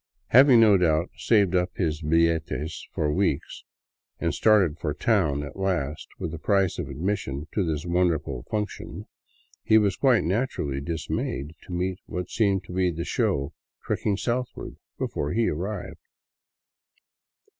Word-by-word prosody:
Having, 130 -1 +7
no 105 -3 +6
doubt, 85 -1 +1
saved 100 -5 +2
up 90 -1 0
his 80 -4 -1
billetes 80 0 0
for 75 -1 0
weeks 90 -6 -1 0.6
and - - 0
started 100 -8 +3
for 75 -2 -2
town 75 -7 +1
at 70 - -8
last 85 -7 -1
with 80 - -4
the 85 - -6
price 95 0 +1
of - - -4
admission 75 -2 -3
to 100 - +1
this 80 -2 -2
wonderful 85 -7 0
" - - -30
function," 105 -1 -4 0.6
he 110 - +4
was 100 -4 +2
quite 130 -5 +3
naturally 85 - -1
dismayed 75 -2 -3
to - - -9
meet 90 +1 -2
what 90 0 -5
seemed 100 -4 +1
to 90 - -10
be 90 0 +2
the 85 0 -4
show 70 0 0 0.3
treking 100 -2 0
southward 120 +3 -3 0.2
before 75 - -2
he 115 0 +2
arrived. 95 +7 -4
90 Hz, 145 wpm, -26 LUFS, 75-100 Hz, 0.6 s, Having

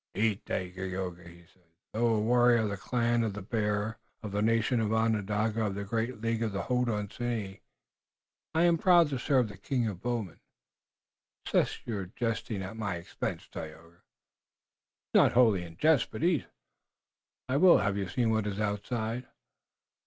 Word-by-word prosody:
"Eat, 105 0 +1
Dagaeoga," 90 -1 -4
he 85 0 -15
said. 95 - -30 0.3
"Though 115 0 +2
a - - +1
warrior 120 +1 +4
of 105 - -1
the - - -2
clan 120 +3 +1
of 110 -3 -1
the 100 -1 -7
Bear, 105 0 -1 0.2
of 105 - -5
the 100 +1 -1
nation 115 +2 +2
Onondaga 110 0 +1
of 100 - -3
the 100 - -3
great 110 +2 -2
League 115 0 -1
of 110 -3 -1
the 100 - -2
Hodenosaunee, 115 -3 -2 0.9
I 165 - +4
am 170 -1 +4
proud 175 -3 +5
to 135 -3 -2
serve 130 -2 +2
the 105 -1 -10
king 120 +2 -1
of 95 -4 -5
bowmen." 115 -7 -3 1.1
"Cease - - +1
your 100 -5 -3
jesting 115 -3 -2
at 95 +4 -7
my 100 -5 -2
expense, 85 0 -5
Tayoga." 80 +2 -10
"It - - -47
is - - -64
not - - +5
wholly 115 -6 +4
a 85 - -8
jest, 135 - +2
but - - -6
eat." 170 -6 +2 1.0
"I 130 +2 +1
will. 180 +3 +7
Have 100 -1 0
you 100 -2 -2
seen 115 +4 +1
what 110 -1 0
is 100 0 -3
outside?" 110 +3 -2
110 Hz, 165 wpm, -30 LUFS, 100-120 Hz, 1.1 s, will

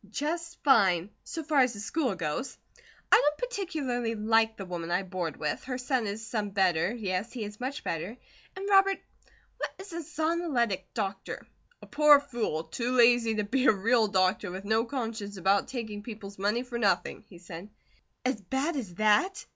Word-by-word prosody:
"Just 335 +8 -3
fine, 195 - +4
so 325 - -5
far 300 -2 +2
as 255 -2 +4
the 205 - -8
school 255 0 -1
goes. 185 - -3 0.5
I - - +10
don't 295 +1 +2
particularly 305 - -2
like 225 +1 +2
the 195 - -6
woman 175 -2 -5
I 180 +3 +1
board 180 -4 -4
with. 150 -1 -3
Her 255 -1 -3
son 250 -3 0
is 210 +2 -5
some 215 -2 -2
better, 190 -2 +2
yes, 205 -2 -3
he 240 -4 -5
is 210 0 -8
much 265 +4 -4
better. 175 +8 -3 0.4
And 385 +1 -5
Robert, 390 -1 +5 0.6
what - - -2
is 385 -2 -10
a 340 - -3
Zonoletic 310 - -1
Doctor?" 195 -4 -4 0.4
"A - - -8
poor 295 -1 +6
fool, 240 - -3
too 235 +10 -3
lazy 240 -2 +5
to 210 - 0
be 260 +6 +1
a - - +9
real 220 +3 +3
doctor, 185 0 +1
with 190 +2 -7
no 220 +2 +2
conscience 225 -6 -4
about 195 +2 +2
taking 220 -5 -5
people's 205 -3 -9
money 210 +5 +1
for 245 -2 -5
nothing," 195 -5 +1
he 180 - -13
said. 175 +2 -9 0.6
"As 255 -4 0
bad 265 - -1
as 210 -11 -5
THAT?" 215 - +2
225 Hz, 180 wpm, -29 LUFS, 195-265 Hz, 0.6 s, I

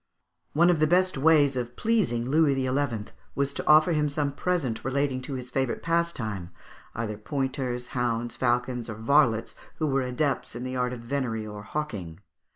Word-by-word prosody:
One 170 +4 +5
of 170 - +1
the 155 - +4
best 185 +3 +3
ways 145 -1 +4
of 120 -1 -3
pleasing 180 - +1
Louis 150 0 +3
XI. 130 -4 -1 0.2
was 140 0 0
to - - -5
offer 155 +3 +6
him 150 -2 +1
some 145 0 -1
present 145 -6 -1
relating 135 0 0
to 135 +1 -5
his 125 -1 -6
favourite 130 -1 -1
pastime, 130 - -1 0.5
either 110 -2 -3
pointers, 130 -1 -2
hounds, 120 -2 -1
falcons, 125 -1 0
or 110 - -4
varlets 115 0 +2 0.2
who 155 - -1
were 135 -2 +1
adepts 130 0 -1
in 120 - -5
the 130 0 -4
art 125 -1 0
of 120 - -7
venery 115 -3 -2
or 105 -1 -7
hawking 105 - -4
(Figs. - - -23
130 Hz, 175 wpm, -27 LUFS, 120-150 Hz, 0.5 s, offer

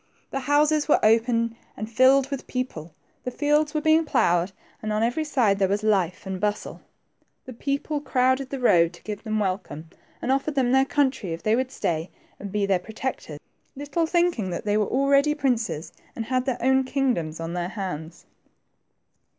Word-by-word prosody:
The 270 - -2
houses 295 +3 +2
were 300 - +4
open 230 +1 +2 0.2
and 215 - -4
filled 260 +4 +4
with 275 - -5
people, 170 -12 -5 0.3
the - - -2
fields 295 +3 +1
were 305 - +1
being 315 +1 +4
ploughed, 175 - +2 0.3
and 215 - -3
on 215 +1 +1
every 245 +7 0
side 240 -10 +1
there 195 - +3
was 200 +2 -1
life 190 -5 +1
and 190 -1 -5
bustle. 210 0 -2 0.6
The 255 - -8
people 280 +4 -2
crowded 260 -1 +1
the 275 - -4
road 170 -8 +4
to 175 - -16
give 210 -1 -5
them 215 -1 -2
welcome, 185 -5 -3 0.3
and 255 - -1
offered 275 +2 0
them 255 -3 +2
their 265 +1 +4
country 265 - 0
if 165 - -7
they 215 +1 +3
would 255 +1 -1
stay 165 -5 -2 0.3
and 200 -1 -7
be 205 0 0
their 195 -2 +2
protectors, 220 - -5 0.4
little 290 +4 -1
thinking 340 - +1
they 205 +4 -1
were 210 -2 +2
already 275 +3 +3
princes 230 - -1 0.2
and 225 - -4
had 255 +1 0
their 260 -3 -1
own 265 +1 +4
kingdoms 250 - -1
on 165 +1 -4
their 175 0 -2
hands. 170 -5 -6
235 Hz, 180 wpm, -25 LUFS, 195-275 Hz, 0.6 s, were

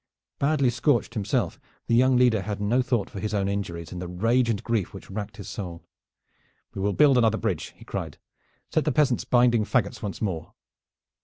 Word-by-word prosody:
Badly 140 -3 +2
scorched 125 -1 +1
himself, 105 -4 -1 0.3
the - - -1
young 130 +2 +5
leader 120 -4 +4
had 100 +1 -4
no 110 +5 +2
thought 125 -5 0
for 100 - -8
his 105 +1 -2
own 100 -1 +1
injuries 90 -5 -4
in 90 - -6
the 90 - -5
rage 115 +7 +1
and 105 -4 -1
grief 110 -5 -1
which 95 - -10
racked 105 +1 -5
his 100 - -8
soul. 85 -4 -6 0.9
"We 95 - -5
will 100 +1 +1
build 140 -1 +5
another 110 -2 +3
bridge," - - -3
he - - -14
cried. - - -5 0.5
"Set - - +1
the - - +2
peasants 140 -6 +2
binding 120 -2 +4
fagots 105 -2 0
once 100 -2 -4
more." 90 -7 -4
110 Hz, 190 wpm, -26 LUFS, 100-125 Hz, 0.9 s, young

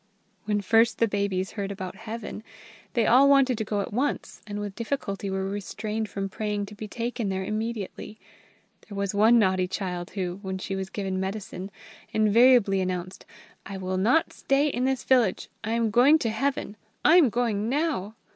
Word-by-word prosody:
When 205 -1 0
first 225 +3 +3
the 230 - +3
babies 200 -2 -1
heard 200 -2 -4
about 190 -2 -6
Heaven, 220 +1 -7 0.5
they 230 -2 +2
all 265 +5 +6
wanted 270 -2 +5
to - - 0
go 205 -1 -1
at 200 - -6
once, 275 +6 -2
and 205 0 -4
with 205 -1 -4
difficulty 205 -4 -3
were 190 0 -2
restrained 210 +2 -4
from 195 -1 -3
praying 210 +1 -3
to 205 - -11
be 215 +1 -7
taken 235 -1 -3
there 190 0 -2
immediately. 215 0 -4 0.7
There 200 - -7
was 200 0 -1
one 220 +4 +5
naughty 185 -4 +2
child 180 -2 -4
who, 185 -1 -3
when 190 -2 -4
she 195 +1 -4
was 190 0 -4
given 190 -1 -3
medicine, 190 -1 -5 0.4
invariably 215 -2 +5
announced, 185 0 -4 0.4
"I 195 0 -7
will 185 0 -3
not 240 +12 +2
stay 280 +2 +1
in 255 -2 -1
this 265 -1 0
village: 245 -7 +2
I 220 +1 -2
am 230 -2 +1
going 255 +7 +6
to 230 -7 -1
Heaven! 235 -3 -2 0.3
I 325 +4 +7
am 310 -8 +6
going 225 -2 0
now!" 270 - -1
210 Hz, 180 wpm, -26 LUFS, 195-235 Hz, 0.7 s, I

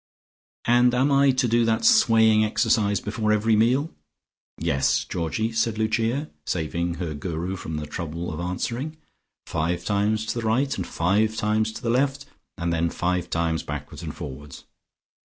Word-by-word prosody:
"And 120 +1 +4
am 135 +3 +2
I 140 0 +5
to 130 -1 +2
do 120 +1 +3
that 115 - +1
swaying 110 - +5
exercise 105 -1 +2
before 105 0 -1
every 110 +1 +3
meal?" 125 +8 +2 0.6
"Yes, 65 0 +1
Georgie," 90 +7 -2
said 115 -1 0
Lucia, 115 +6 0
saving 85 +1 -2
her 85 -2 -4
Guru 85 +5 -4
from 80 -4 -5
the 75 - -4
trouble 85 +2 -5
of 75 - -6
answering. 120 - -3 0.5
"Five 85 +2 -2
times 105 +1 +1
to - - -2
the 115 - -4
right 130 +5 +1
and 90 - -4
five 105 +6 +1
times 110 +1 0
to - - -9
the 115 - +1
left 140 +3 0 0.3
and 85 0 -1
then 85 0 +1
five 90 +1 -1
times 85 -1 0
backwards - - -7
and - - -6
forwards. 70 +1 -9
110 Hz, 160 wpm, -24 LUFS, 85-115 Hz, 0.6 s, I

